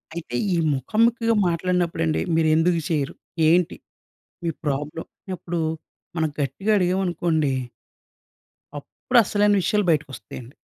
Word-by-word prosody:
అయితే, 155 -8 -6 0.2
ఈ - - +2 0.2
ముఖాముఖిగా 230 - +1
మాట్లాడినప్పుడండి. 170 -2 0
మీరెందుకు 165 +2 +3
చెయరు? 145 -4 -1 0.3
ఏంటి 175 +1 +2 0.7
మీ 170 - +1
ప్రాబ్లమ్? 150 +3 -3 0.3
అప్పుడు 175 -1 -4 0.6
మనం 160 -1 +1
గట్టిగా 145 - -2
అడిగావనుకోండి... 175 -5 +1 1.3
అప్పుడసలైన 210 - +2
విషయాలు 210 +2 +1
బయటికొస్తయండి. 130 -4 -4
165 Hz, 90 wpm, -23 LUFS, 150-185 Hz, 1.3 s, మీరెందుకు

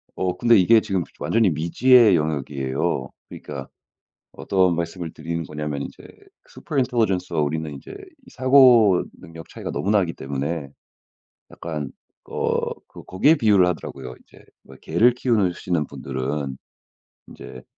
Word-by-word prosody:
어 90 -1 -2
근데 120 +3 +4
이게 110 +4 +5
지금 95 -4 -2 0.2
완전히 110 -4 +2
미지의 105 - +4
영역이에요. 70 -4 -2 0.2
그러니까 70 -2 -8 0.7
어떤 95 -3 +1
말씀을 85 0 -4
드리는 85 +1 -5
거냐면 75 -2 -5
이제 - - -10 0.5
super 150 - -8
intelligence와 105 - 0
우리는 75 +1 -2
인제 70 - -10 0.4
사고능력 115 -11 +3
차이가 - - -7
너무 100 - -2
나기 95 -6 +2
때문에 70 +2 -4 0.8
약간 75 -4 -6 0.3
어 - - -2 0.2
그 - - -13
거기에 145 - +3
비유를 105 -8 +4
하더라고요. 65 -7 -6
이제 - - -20 0.4
개를 115 +10 +3
키우느 115 -7 +1
시는 85 -5 -2
분들은 70 0 -4 0.7
인제 65 0 -11
85 Hz, 340 characters per minute, -22 LUFS, 75-105 Hz, 0.8 s, 이게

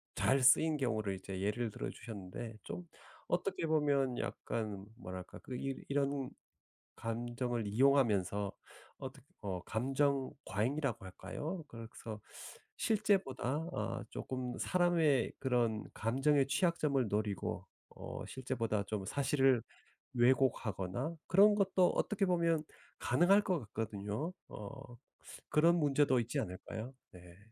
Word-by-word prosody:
잘 135 +1 +3
쓰인 150 +4 +6
경우를 110 -7 0
이제 95 0 -6
예를 110 +4 0
들어주셨는데 110 +2 -6
좀 175 -1 -6 0.4
어떻게 175 -2 0
보면 140 -5 +2
약간 105 -4 -3
뭐랄까 90 -5 -7
그 125 - -7
이 135 +1 -3
이런 140 -1 0 0.6
감정을 120 0 -2
이용하면서 105 -5 +3 0.5
어떻 135 +1 -7 0.2
어 95 -4 -3
감정 135 +5 +1
과잉이라고 120 +1 -1
할까요? 160 - -5
그래서 115 -1 -8 0.6
실제보다 195 - +1
어 - - -2
쪼끔 130 -1 -4
사람의 165 -7 +3
그런 120 -5 +1
감정의 135 +5 +2
취약점을 150 - +2
노리고 105 -2 -1 0.2
어 - - -7
실제보다 120 -5 -1
좀 105 -3 -3
사실을 135 0 +3 0.5
왜곡하거나 125 - +2
그런 205 +3 +7
것도 190 -3 +4
어떻게 210 -2 +1
보면 170 -3 +2 0.4
가능할 195 +4 +5
것 185 -5 +1
같거든요. 110 - -3 0.2
어 120 +4 -9 0.5
그런 165 +3 +5
문제도 145 -4 +4
있지 115 0 -1
않을까요? 110 +7 -5 0.2
네. 90 -1 -14
130 Hz, 265 characters per minute, -35 LUFS, 110-150 Hz, 0.6 s, 그런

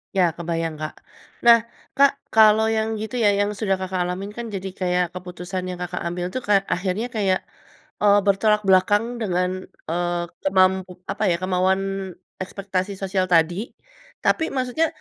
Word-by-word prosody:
Iya 185 - +4
kebayang, 165 -1 -2
Kak. 155 - -4 0.5
Nah, 235 -1 +9 0.4
Kak 280 0 +6 0.2
kalau 220 0 +6
yang 220 0 0
gitu 220 +3 -5
ya, 205 - +6
yang 205 0 +1
sudah 195 -3 +1
Kakak 185 -1 -3
alamin 190 +3 -4
kan 235 - -4
jadi 195 0 -4
kayak 180 -1 +1
keputusan 180 +1 -6
yang 180 - -5
Kakak 180 0 -4
ambil 175 +1 -3
tuh 255 - -2
kayak, 200 -1 +4
akhirnya 190 +5 -2
kayak, 190 -3 +2 0.6
eee, 205 -1 +6
bertolak 210 +2 +3
belakang 205 +3 +4 0.2
dengan, 180 -4 0 0.4
eee, 175 +1 -1 0.3
kemampu 190 -1 +3 0.2
apa - - -6
ya, 170 - +3
kemauan 185 +1 +2 0.6
ekspektasi 190 0 -3
sosial 190 -1 0
tadi. 165 0 +4 0.7
Tapi 320 - +3
maksudnya 260 +5 +1
190 Hz, 150 wpm, -23 LUFS, 180-210 Hz, 0.7 s, Nah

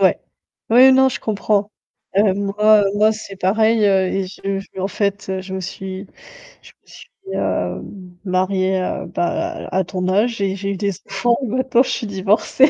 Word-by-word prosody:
Ouais. - - +4 0.5
Ouais, 255 +3 +8
non, 265 0 +5
je 260 - -4
comprends. 210 -1 0 0.5
Heu, 200 -1 +4
moi 205 +1 +3
moi 215 +1 +4
c'est 205 -2 -9
pareil, 220 +4 +2
heu, 190 -2 +3
et 190 +1 -1
je 195 +1 -4
je 195 - -12
me 190 - -5
en 190 - 0
fait, 200 0 -2
heu, 190 0 -2
je 190 0 -7
me 190 - -3
suis 190 +2 -6 0.6
je - - -16
me - - -38
suis, - - -14 0.3
heu, - - -1
m 180 -3 -12
mariée, 185 0 +1
heu, - - -3
bah, 175 - -2
à - - -6
à 190 - +3
ton 185 0 -3
âge 215 +3 +1
et 195 -1 0
j'ai 195 0 -3
eu 195 - -3
des 200 +1 -1
enfants 235 +5 +1
maintenant 255 +1 +2
je - - -5
suis 225 - -2
divorcée. 205 +7 +3
200 Hz, 200 wpm, -19 LUFS, 190-215 Hz, 0.6 s, Ouais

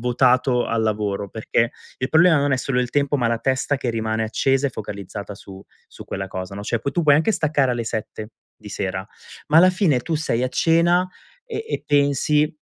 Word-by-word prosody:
votato 125 +1 +2
al 115 0 0
lavoro 105 -2 -2
perché 115 +2 -1 0.3
il 130 - -2
problema 160 +1 +5
non 140 0 +1
è 130 - +3
solo 130 0 -1
il 125 - -2
tempo, 145 0 +1
ma 120 - 0
la 115 0 0
testa 130 +4 0
che 130 -2 -2
rimane 110 -1 -2
accesa 135 +5 +1
e - - -11
focalizzata 100 -2 -7
su 95 -1 -12 0.3
su - - -12
quella 95 0 -5
cosa, 95 +1 -6
no, 100 - -6
cioè, 115 +2 -1
poi 140 +5 -4
tu 175 - 0
puoi 145 -2 +5
anche 165 +8 +2
staccare 145 -7 +1
alle 120 -1 -2
7:00 110 0 -5 0.3
di 105 - -12
sera 95 -1 -3 0.4
ma, 155 - +3
alla 185 +2 +7
fine, 180 -8 +2
tu 165 +6 -3
sei 140 -6 -1
a 130 - 0
cena 170 +5 +2 0.4
e 450 -2 -5
e - - -3
pensi: 145 +1 +2
125 Hz, 210 wpm, -22 LUFS, 110-150 Hz, 0.4 s, alla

